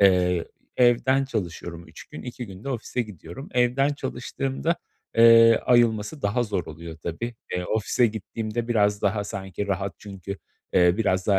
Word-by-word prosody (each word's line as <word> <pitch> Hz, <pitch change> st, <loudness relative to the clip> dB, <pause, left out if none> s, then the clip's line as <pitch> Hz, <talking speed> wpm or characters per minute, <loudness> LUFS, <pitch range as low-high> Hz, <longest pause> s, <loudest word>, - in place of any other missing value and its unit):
Eee, 90 Hz, -3 st, +4 dB, 0.3 s
evden 130 Hz, +2 st, +4 dB
çalışıyorum 85 Hz, -8 st, -5 dB
3 -, -, -12 dB
gün, 80 Hz, -, -10 dB
2 120 Hz, -1 st, -6 dB
gün 95 Hz, +1 st, -11 dB
de -, -, -4 dB
ofise 125 Hz, -1 st, -2 dB
gidiyorum. 100 Hz, -, -10 dB
Evden 125 Hz, +3 st, +3 dB
çalıştığımda, 135 Hz, +3 st, -2 dB, 0.4 s
eee, 115 Hz, 0 st, +8 dB
ayılması 120 Hz, +2 st, +2 dB
daha 105 Hz, +5 st, +1 dB
zor 100 Hz, -7 st, -2 dB
oluyor 80 Hz, +1 st, -8 dB
tabii. 115 Hz, +9 st, -4 dB, 0.2 s
Eee, 90 Hz, -, -1 dB
ofise 110 Hz, +4 st, +2 dB
gittiğimde 110 Hz, +2 st, -4 dB
biraz 105 Hz, -3 st, +2 dB
daha 105 Hz, 0 st, +1 dB
sanki 100 Hz, -1 st, -5 dB
rahat 100 Hz, 0 st, -2 dB
çünkü, 100 Hz, -1 st, -7 dB, 0.3 s
eee, 90 Hz, 0 st, +5 dB
biraz 95 Hz, -4 st, +1 dB
daha 100 Hz, -2 st, +4 dB
105 Hz, 155 wpm, -25 LUFS, 95-120 Hz, 0.4 s, eee